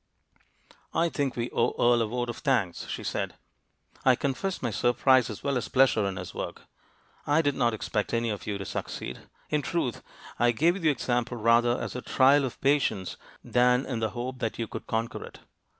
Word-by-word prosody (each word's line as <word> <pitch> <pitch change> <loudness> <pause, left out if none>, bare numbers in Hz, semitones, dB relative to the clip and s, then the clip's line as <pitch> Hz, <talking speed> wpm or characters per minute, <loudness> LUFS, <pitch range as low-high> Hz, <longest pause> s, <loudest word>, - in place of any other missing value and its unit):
"I 170 +1 +3
think 140 -5 -1
we 120 0 -3
owe - - +1
Earle 120 0 +4
a 115 - +1
vote 120 +2 -2
of - - -10
thanks," 115 - 0
she - - -5
said. - - -3 0.7
"I 130 -1 +6
confess 145 +9 -2
my 120 - -2
surprise 125 +3 +3
as 105 - -7
well 140 -2 +1
as 125 - -3
pleasure 130 -6 +3
in 95 - -3
his 90 -1 -7
work; - - -6 0.6
I 150 +3 +3
did 145 -1 +2
not 120 -4 +1
expect 105 -1 -2
any 115 -1 0
of 105 - -6
you 105 -1 -1
to 95 - -6
succeed. - - -5 0.3
In 150 -1 +2
truth, 150 -5 -2 0.4
I 120 0 +4
gave 165 +9 +3
you - - -8
the 160 - +3
example 120 -3 -1
rather 120 +2 +3
as - - -5
a 125 - -3
trial 135 +3 +4
of 125 - -6
patience 135 -9 +1 0.3
than 125 +1 +3
in 125 -4 -3
the 110 -1 0
hope 125 +2 -5
that 115 -3 -2
you 115 - -2
could - - -8
conquer 115 +1 -2
it. - - -12
125 Hz, 200 wpm, -28 LUFS, 115-135 Hz, 0.7 s, I